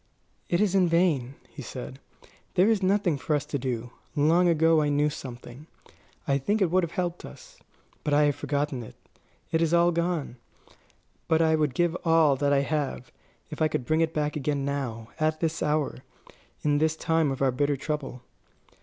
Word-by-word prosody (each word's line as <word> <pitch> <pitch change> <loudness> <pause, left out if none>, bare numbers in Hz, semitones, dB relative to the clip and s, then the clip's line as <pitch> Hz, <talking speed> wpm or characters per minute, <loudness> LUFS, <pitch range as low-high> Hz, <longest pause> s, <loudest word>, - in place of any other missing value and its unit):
"It 175 - +1
is 205 -3 +2
in 190 -2 +4
vain," 155 -7 +1
he 150 - -10
said; 130 +2 -8 0.6
"there 185 +2 +5
is 215 -3 +1
nothing 185 -5 +1
for 150 - 0
us 145 -1 -2
to 145 -1 -3
do. 125 -2 -4 0.2
Long 165 +5 +4
ago 165 -1 +4
I 150 - +1
knew 145 +1 +2
something. 125 +1 -9 0.6
I 140 -1 +2
think 205 +11 0
it 185 -5 +2
would 185 +1 +4
have 170 -2 -4
helped 175 -1 -3
us. - - -13 0.4
But 150 - -1
I 145 +1 +4
have 145 -1 +2
forgotten 145 -3 -2
it. 115 - -11 0.6
It 165 0 +1
is 165 0 +2
all 170 0 +4
gone. 170 -6 -2 0.9
But 160 0 +3
I 160 0 +3
would 150 -4 +1
give 175 -1 +1
all 165 -4 +4
that 140 +1 +1
I 140 -1 +4
have, 140 -3 -3 0.4
if 150 - -7
I 155 - +5
could 130 -5 -3
bring 155 +5 +1
it 165 -1 +1
back 150 -1 -2
again 145 -1 -1
now, 125 -6 -4
at 155 0 +1
this 165 -1 -1
hour, 150 -3 0 0.6
in 145 -1 +2
this 160 0 +1
time 160 -2 +1
of 135 0 -2
our 135 - +3
bitter 145 +2 0
trouble." 140 -3 -4
150 Hz, 190 wpm, -27 LUFS, 140-165 Hz, 0.9 s, there